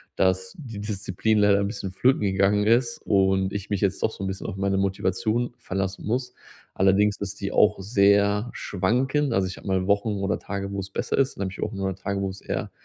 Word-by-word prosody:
dass 95 0 +1
die 115 -9 -8
Disziplin 105 +1 -1
leider 100 -1 +5
'n 100 - 0
bisschen 100 -2 -5
flöten 130 +8 +2
gegangen 100 +1 +2
ist 115 +1 +2
und 95 -1 +2
ich 100 -1 -5
mich 100 -2 -1
jetzt 100 -2 0
doch - - +2
so 100 - -8
'n - - -2
bisschen 95 0 -5
auf - - -5
meine 100 0 0
Motivation 100 +5 0
verlassen 95 -4 -4
muss. 125 +3 -2 0.4
Allerdings 100 +2 +3
ist 100 0 -5
die 100 0 -2
auch 105 -1 +4
sehr 100 +2 +3
schwankend. 125 +8 0
Also 95 -3 +1
ich 90 - -7
habe - - -11
mal 95 -1 +1
Wochen 100 +1 +2
oder 100 +1 -1
Tage, 100 -1 -5
wo 100 - -3
es 95 0 -5
besser - - -2
ist, 135 -1 +2
dann 100 - -3
habe 95 - -3
ich 95 - -9
auch - - -2
mal 95 -1 -2
Tage, 100 +1 -3
wo 95 - -1
es 95 +1 -8
eher - - -4
100 Hz, 225 wpm, -25 LUFS, 95-105 Hz, 0.4 s, leider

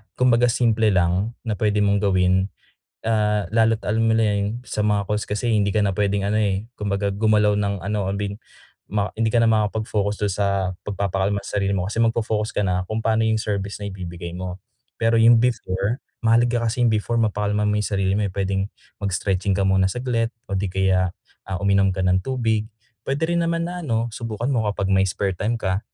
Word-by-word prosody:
kumbaga 125 -1 +4
simple 115 -2 +2
lang 90 +5 +1
na 105 - 0
puwede 105 0 +1
mong 100 0 +2
gawin, 95 -1 +2 0.6
ah, 105 -2 +1
lalo't 115 0 +3
alam 110 +2 +1
nila 110 -2 +2
yun 105 +4 -2
sa 105 - -2
mga 105 -2 +1
calls 105 0 -1
kasi 110 +3 -1
hindi 100 -1 +2
ka 105 - +2
na 100 -1 +1
puwedeng 100 -1 +1
ano, 105 - +1
eh, 100 0 0
kumbaga 100 -1 -1
gumalaw 105 0 +3
ng 100 -1 -1
ano, 100 -1 -1
abin, 100 0 -3 0.5
ma 105 -1 -1
hindi 115 - +2
ka 115 +1 +3
na 115 - +4
makapag-focus 105 -1 0
dun 105 - +1
sa 100 +2 0 0.4
pagpapakalma 100 0 -1
sa 105 - -2
sarili 100 0 0
mo. 90 0 -1
Kasi 115 - -2
magfo-focus 110 -1 0
ka 105 - +1
na 90 -1 -1
kung 110 +1 -3
paano 110 0 +2
yung 110 0 +2
service 100 -1 -3
na 100 - -4
ibibigay 85 -2 -7
mo. 90 +1 -6 0.3
Pero 115 0 +2
yung 115 +1 +7
before, 110 -1 -1 0.2
mahalaga 120 +1 +3
ka - - 0
kasi 125 - -2
yung - - +3
before 115 +2 0
mapakalma 105 -1 0
mo 105 - +1
yung 105 - 0
sarili 95 -1 0
mo, 105 - +1
eh, 100 - -3
puwedeng 95 0 -1 0.4
mag-stretching 95 0 0
ka 95 0 +1
muna 95 0 +3
saglit 120 -1 -1 0.2
o 100 - -3
di 95 -1 -1
kaya, 95 -1 +2 0.3
ah, 95 -2 -4
uminom 100 0 +3
ka 95 - -5
ng 95 0 +2
tubig, 115 -5 0 0.4
puwede 140 +6 -2
rin 170 0 +1
naman 170 0 0
na 180 0 -5
ano, 115 -3 0
subukan 115 +1 -4
mo 115 -5 +1
kapag 100 -1 -1
may 95 0 +4
spare 95 +2 -1
time 110 +6 -1
ka, 95 -1 0
105 Hz, 205 wpm, -22 LUFS, 95-115 Hz, 0.6 s, yung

